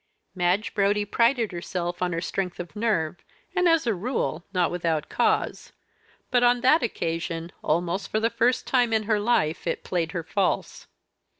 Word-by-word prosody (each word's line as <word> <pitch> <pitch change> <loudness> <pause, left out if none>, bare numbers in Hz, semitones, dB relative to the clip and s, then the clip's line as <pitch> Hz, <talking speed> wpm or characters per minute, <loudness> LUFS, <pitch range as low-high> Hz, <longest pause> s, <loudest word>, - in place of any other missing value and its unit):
Madge 185 +3 0
Brodie 205 0 +2
prided 230 +2 +2
herself 175 0 -4
on 180 -1 +1
her 165 0 -2
strength 185 0 -3
of 175 +3 -7
nerve, 210 -7 0 0.4
and 360 -1 +4
as, 330 -4 +3
a 230 - +2
rule, 175 - -2
not 180 -3 +1
without 165 -3 -1
cause. - - 0 0.6
But, 245 -1 +4
on 245 0 +4
that 300 +6 +5
occasion, 165 -5 -3
almost 175 +5 0
for 215 - 0
the 230 +1 +1
first 250 +1 +1
time 245 -3 +2
in 220 -1 +2
her 215 0 +1
life 185 -8 +1
it - - -2
played 165 -3 -2
her 170 - -3
false. 195 +4 -1
195 Hz, 170 wpm, -25 LUFS, 170-230 Hz, 0.6 s, that